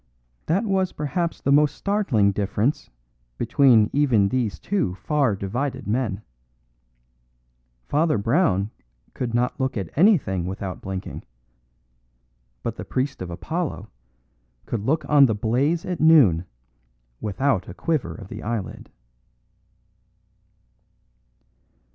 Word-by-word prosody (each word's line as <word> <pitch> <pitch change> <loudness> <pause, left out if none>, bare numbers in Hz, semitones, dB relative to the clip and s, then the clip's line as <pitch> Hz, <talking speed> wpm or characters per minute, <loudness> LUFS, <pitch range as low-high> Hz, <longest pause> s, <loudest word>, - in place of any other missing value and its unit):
That 190 +8 +1
was 190 -3 0
perhaps 165 +3 -2
the 140 - +1
most 145 +1 +4
startling 155 - +1
difference 105 +7 -1 0.5
between 120 -2 +4
even 125 -9 +3
these 120 -4 -1
two 185 - -1
far 135 - 0
divided 125 +7 -3
men. 105 -2 -1 1.6
Father 155 -2 +2
Brown 110 - +1 0.4
could 120 -2 -3
not 125 +1 0
look 130 -2 -1
at 95 -5 -5
anything 140 - +3
without 95 0 -5
blinking; 95 -1 -6 1.4
but - - -3
the - - -5
priest 135 -1 -2
of 90 - -5
Apollo 160 - -4 0.7
could 115 - -3
look 140 +6 0
on 145 -2 +6
the 110 - 0
blaze 130 +10 0
at 180 -2 -3
noon 130 - +5 0.7
without 110 0 -1
a - - -7
quiver 160 -5 -1
of 100 - -10
the - - -8
eyelid. 115 -2 -5
125 Hz, 110 wpm, -23 LUFS, 100-150 Hz, 1.6 s, on